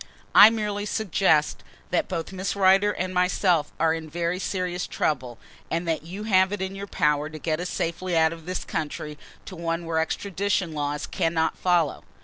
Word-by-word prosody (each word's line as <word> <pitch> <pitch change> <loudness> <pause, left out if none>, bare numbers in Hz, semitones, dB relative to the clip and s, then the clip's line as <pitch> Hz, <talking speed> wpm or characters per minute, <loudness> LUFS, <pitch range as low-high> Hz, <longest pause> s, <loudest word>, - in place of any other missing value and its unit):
"I 215 - +10
merely 210 -2 -2
suggest 185 -8 +1 0.3
that 180 - +1
both 170 -2 -4
Miss 190 +2 -3
Rider 195 +1 +4
and 185 -2 -3
myself 180 -2 +2
are 160 0 +3
in 160 -1 -5
very 170 +2 -2
serious 180 -2 -2
trouble 125 -6 -2 0.3
and 170 +1 -2
that 160 -1 0
you 180 +6 -7
have 190 -3 +3
it 205 - -3
in 190 0 -3
your 200 +1 -6
power 150 -5 +1
to 155 - -8
get 155 +1 -2
us 180 0 -3
safely 170 +1 -2
out 160 0 +3
of 165 0 -12
this 185 0 -3
country 150 -1 -4 0.3
to 190 - -8
one 165 0 -3
where 165 -1 0
extradition 190 +1 -1
laws 145 0 -2
cannot 160 -1 0
follow." 175 -4 +1
175 Hz, 180 wpm, -25 LUFS, 160-190 Hz, 0.3 s, I